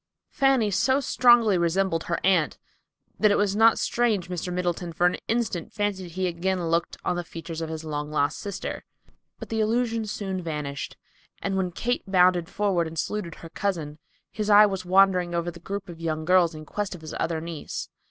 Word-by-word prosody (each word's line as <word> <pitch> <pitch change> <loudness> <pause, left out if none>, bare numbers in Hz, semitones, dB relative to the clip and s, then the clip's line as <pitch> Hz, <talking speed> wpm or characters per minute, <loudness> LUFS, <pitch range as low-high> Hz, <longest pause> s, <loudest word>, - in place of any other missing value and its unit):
Fanny 265 -6 +3
so 260 +8 +2
strongly 240 -7 +4
resembled 170 0 +1
her 170 - -1
Aunt 180 -5 +2 0.6
that 215 - +5
it 205 - +3
was 205 -1 +1
not 225 +1 +5
strange 220 -7 0
Mr. 180 0 -3
Middleton 175 -1 -2
for 175 +2 +1
an 180 - +3
instant 225 -8 -1
fancied 195 -5 -3
he 185 +1 -1
again 180 0 -1
looked 170 +1 0
on 180 - +1
the 175 - -2
features 165 -1 -7
of 160 - -3
his 160 0 -5
long 150 -1 -4
lost 150 0 0
sister. 200 -1 -5 0.5
But - - -9
the 225 - -1
illusion 225 +1 +1
soon 195 -3 -4
vanished, 150 -4 -5 0.4
and 195 -1 -2
when 185 -2 0
Kate 245 +7 -1
bounded 180 -2 +3
forward 190 -5 0
and 160 0 -9
saluted 180 -2 -3
her 165 - -11
cousin, 160 -6 -3 0.3
his 215 -1 -3
eye 210 0 +8
was 195 -2 -3
wandering 185 -2 +4
over 170 0 -1
the 170 - -13
group 195 +2 -5
of 170 -2 -10
young 155 -1 -2
girls 175 -2 +4
in 155 0 -9
quest 205 +2 -3
of 170 - -12
his 155 -1 -8
other 165 -1 -1
niece. 165 -1 -6
180 Hz, 190 wpm, -26 LUFS, 165-205 Hz, 0.6 s, eye